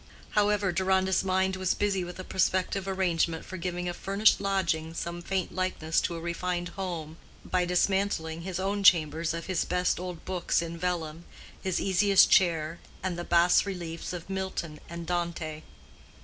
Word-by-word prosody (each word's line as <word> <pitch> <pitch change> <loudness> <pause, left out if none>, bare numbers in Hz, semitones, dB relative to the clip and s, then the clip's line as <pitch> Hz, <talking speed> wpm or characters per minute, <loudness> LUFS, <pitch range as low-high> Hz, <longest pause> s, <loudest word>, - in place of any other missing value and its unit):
However, 205 -2 +2
Deronda's 190 +1 +2
mind 190 0 +1
was 185 -1 0
busy 200 -3 0
with 175 0 -7
a 185 - -6
prospective 185 +1 0
arrangement 175 -4 0
for 185 - -7
giving 180 0 -3
a 175 - -2
furnished 200 +4 +3
lodging 170 -5 0
some 170 +1 -4
faint 190 0 -2
likeness 180 -3 0
to 170 - -2
a - - -5
refined 175 +1 -2
home 165 -5 -5 0.3
by 180 -1 +1
dismantling 180 -2 0
his 185 0 -4
own 200 +2 -1
chambers 165 -2 +4
of 165 - -5
his 185 -3 0
best 180 -1 0
old 180 -2 -6
books 185 -2 0
in 170 -1 -4
vellum, 170 -2 -3 0.4
his 185 -2 -1
easiest 195 0 +4
chair, 165 -3 +3 0.2
and 185 -2 -1
the 175 - -4
bas 175 +1 +4
reliefs 170 -4 -5
of 175 -2 -6
Milton 190 -5 -4
and 170 0 -6
Dante. 170 -3 -3
180 Hz, 165 wpm, -28 LUFS, 170-190 Hz, 0.4 s, chambers